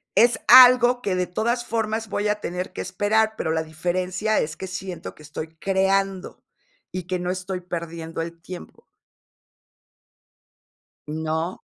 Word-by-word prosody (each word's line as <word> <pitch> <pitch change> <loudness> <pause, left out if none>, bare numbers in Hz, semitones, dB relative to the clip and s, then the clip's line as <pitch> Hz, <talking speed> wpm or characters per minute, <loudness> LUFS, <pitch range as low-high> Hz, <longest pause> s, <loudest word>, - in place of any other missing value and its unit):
Es 240 +1 +5
algo 250 -1 +8
que, 195 -5 -1
de 180 0 0
todas 235 +7 -1
formas, 225 0 -2
voy 205 0 -1
a 210 0 0
tener 180 -1 -4
que - - -5
esperar, 215 +4 +1
pero 160 - -2
la 160 0 0
diferencia 180 +6 -1
es 150 0 -2
que 190 - -7
siento 185 -1 -6
que 155 - -16
estoy 155 +1 -6
creando, 195 +1 0 0.5
y 185 -2 -5
que 185 0 -1
no 180 0 -2
estoy 185 0 -4
perdiendo 165 -2 -5
el 170 0 -6
tiempo. 180 +1 -11 2.2
¿No? 160 +3 -3
185 Hz, 145 wpm, -23 LUFS, 170-210 Hz, 2.2 s, algo